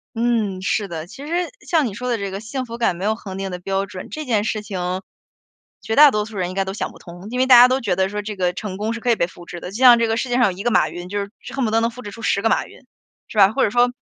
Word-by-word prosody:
嗯， 225 -5 0
是 200 +2 0
的。 165 -3 -6
其 270 +11 -11
实 345 +2 -1 0.2
像 320 -4 +2
你 220 - -3
说 250 +5 -4
的 240 - +1
这 200 -2 -4
个 195 - -5
“幸 255 +4 -4
福 235 -1 -7
感 230 -6 +1
没 185 +3 -5
有 215 - +2
恒 195 -4 -8
定 195 0 -4
的 180 - -5
标 195 +2 -1
准”， 185 -1 -9
这 310 0 -6
件 220 -5 +1
事 215 0 -2
情， 185 -2 -3 0.8
绝 220 - -2
大 295 +1 +9
多 210 -5 -1
数 215 -1 -9
人 180 -1 -1
应 185 - -7
该 195 0 0
都 190 - -4
想 210 - -4
不 - - -15
通。 175 +2 -11
因 250 - -4
为 260 - +4
大 260 -1 +8
家 245 +1 +10
都 260 +1 +1
觉 205 - 0
得 190 +1 +1
说， 210 +1 -3
这 210 0 -6
个 180 -2 0
成 190 -1 -6
功 215 +3 -2
是 230 - -5
可 240 +1 +1
以 - - +4
被 170 - 0
复 175 -1 -14
制 175 - -8
的。 180 - -7
就 205 - -6
像 245 -2 +7
这 230 - +2
个 225 0 0
世 255 - -2
界 245 - 0
上 250 - +5
有 195 - +2
1 200 - -6
个 240 - +1
马 - - +3
云， 175 +3 -8
就 205 +2 -3
是 200 0 -4
是 - - -10
恨 270 - -1
不 - - 0
得 225 - +3
能 230 - +1
复 250 +2 -10
制 220 - -7
出 225 +3 -11
10 200 - +1
个 225 - +2
马 - - +1
云， - - -15 0.5
是 - - -10
吧？ 195 -1 +7
或 - - +1
者 - - +3
说 245 +3 +3
210 Hz, 360 characters per minute, -21 LUFS, 190-240 Hz, 0.8 s, 家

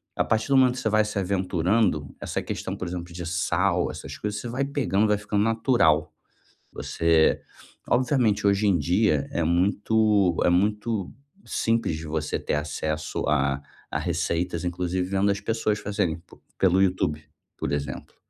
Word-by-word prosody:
a - - +2
partir 110 0 0
do 135 - +5
momento 130 -1 +5
que - - -5
você 110 - 0
vai 110 0 +3
se 105 0 -4
aventurando 90 -4 0
essa - - -3
questão, - - -4
por 90 - -4
exemplo, 90 0 -6
de 85 0 -6
sal, 90 +1 0
essas - - -8
coisas, 105 0 -3
você 120 - -6
vai 125 +4 -2
pegando, 130 -7 +1
vai 105 0 +2
ficando 105 0 -1
natural. 105 - +2 0.6
Você, 80 -1 +2 0.5
obviamente, 120 -5 +2
hoje 100 +1 +3
em 95 -3 +4
dia 85 -1 +1
é 85 - 0
muito 100 +2 +2
é - - +4
muito 105 +2 0 0.3
simples 115 -7 0
de 80 +1 -7
você 75 0 -2
ter - - -2
acesso 75 +1 -3
a 70 -1 +1 0.3
a - - -1
receitas, 85 0 -1
inclusive 90 +1 -1
vendo 100 +1 +2
as 100 - -2
pessoas 105 0 -1
fazerem 95 -5 -1
p 85 - -19 0.2
pelo 95 0 +3
YouTube, 90 -5 0 0.3
por - - -3
exemplo. 70 -2 -4
95 Hz, 165 wpm, -25 LUFS, 85-105 Hz, 0.6 s, do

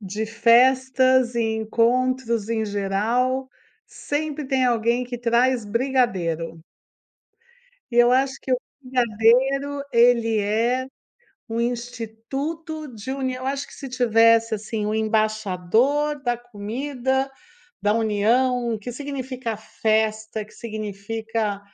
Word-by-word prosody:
de 210 +2 -4
festas 255 +2 +4
e 235 - 0 0.2
encontros, 235 0 +1
em 225 -1 0
geral, 220 +6 0 0.4
sempre 300 0 -4
tem 265 -1 +1
alguém 235 0 +2
que 245 0 -5
traz 240 0 +2
brigadeiro. 190 - -1 1.3
E 240 - -4
eu 240 0 +6
acho 265 +1 +1
que 260 - -3
o 255 - +4 0.3
brigadeiro, 255 +3 +2
ele 235 -2 +4
é 230 +5 0 0.6
um 225 +1 -2
instituto 245 +7 -4
de 220 +4 -7
união, 260 -1 -3
eu - - -3
acho 275 +1 -2
que - - -14
se 275 - -8
tivesse, 230 -2 +4
assim, 215 0 -3
um 215 - -1
embaixador 220 +6 +1
da 240 -2 0
comida, 250 +4 -3 0.5
da 205 0 +3
união, 230 +2 +1
que 245 +3 -6
significa 260 -4 -5
festa, 220 0 -1
que 210 - -19
significa, 215 0 -4
235 Hz, 115 wpm, -23 LUFS, 220-260 Hz, 1.3 s, eu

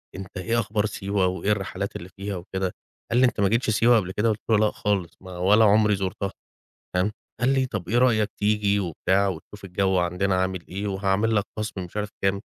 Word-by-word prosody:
"أنت 95 +1 -8
إيه 115 +5 0
أخبار 105 0 0
سيوة؟ 100 -2 -1
وإيه 95 +3 -1
الرحلات 100 -1 -2
اللي 90 +2 -7
فيها 100 +2 -5
وكده؟" 95 +1 -3 0.4
قال 120 - +3
لي:"أنت 125 -4 +3
ما 100 - +4
جيتش 115 +1 +1
سيوة 115 +3 +4
قبل 95 -1 -4
كده؟" 105 +4 +1
قلت 110 0 -1
له: 110 - +5
"لأ 105 0 +3
خالص، 100 -5 -2
ما 95 -1 -9
ولا 105 +5 +5
عمري 105 0 +4
زُرتها."، 95 +1 -3 0.6
تمام، 95 +4 +2 0.3
قال 125 +1 +2
لي 130 -1 +2
طَب 100 -7 -5
إيه 120 - +2
رأيك 110 -4 +3
تيجي 105 -1 +2
وبتاع 95 +2 +1
وتشوف 95 +3 -7
الجو 95 +1 +1
عندنا 90 +2 0
عامل 95 -2 -3
إيه 100 +2 -4
وهاعمل 100 +3 +1
لك 100 - +3
خصم 105 -3 -3
مش 90 - -10
عارف 105 0 -2
كام. 95 +1 +1
100 Hz, 205 wpm, -25 LUFS, 95-105 Hz, 0.6 s, له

